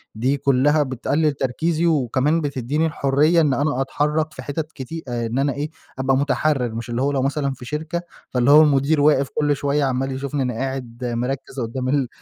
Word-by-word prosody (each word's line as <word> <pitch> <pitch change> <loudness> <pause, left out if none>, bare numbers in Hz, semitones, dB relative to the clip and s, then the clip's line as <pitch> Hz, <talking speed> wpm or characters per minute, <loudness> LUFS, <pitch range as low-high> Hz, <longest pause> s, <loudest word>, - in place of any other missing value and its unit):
دي 130 +6 +1
كُلّها 140 +3 +3
بتقلّل 145 +3 0
تركيزي 155 +6 -1
وكمان 150 0 +2
بتدّيني 145 +1 -1
الحرية 150 +2 +2
إن 145 -4 +2
أنا 145 -2 0
أتحرّك 150 +3 -1
في 130 - -8
حتت 155 +3 -4
كتي 160 +5 -7
آآ 120 -1 -2
إن 115 +4 -2
أنا 140 -1 +1
إيه، 145 +2 -3 0.3
أبقى 135 0 +2
مُتحرّر. 135 -3 0
مش 115 +1 -5
اللي 120 +1 -2
هو 140 +2 +1
لو 135 -2 0
مثلًا 140 0 -1
في 125 - -11
شركة، 155 +5 -3 0.3
فاللي 125 +2 +2
هو 150 +2 +9
المدير 145 0 +3
واقف 145 -2 +4
كل 145 -1 +2
شوية 140 +1 0
عمّال 135 0 0
يشوفني 140 +2 -3
أنا 125 -1 -2
قاعد 125 -1 -4
مركِّز 125 +3 -3
قدّام 125 +2 -3
ال 140 -2 +1
140 Hz, 190 wpm, -21 LUFS, 130-150 Hz, 0.3 s, هو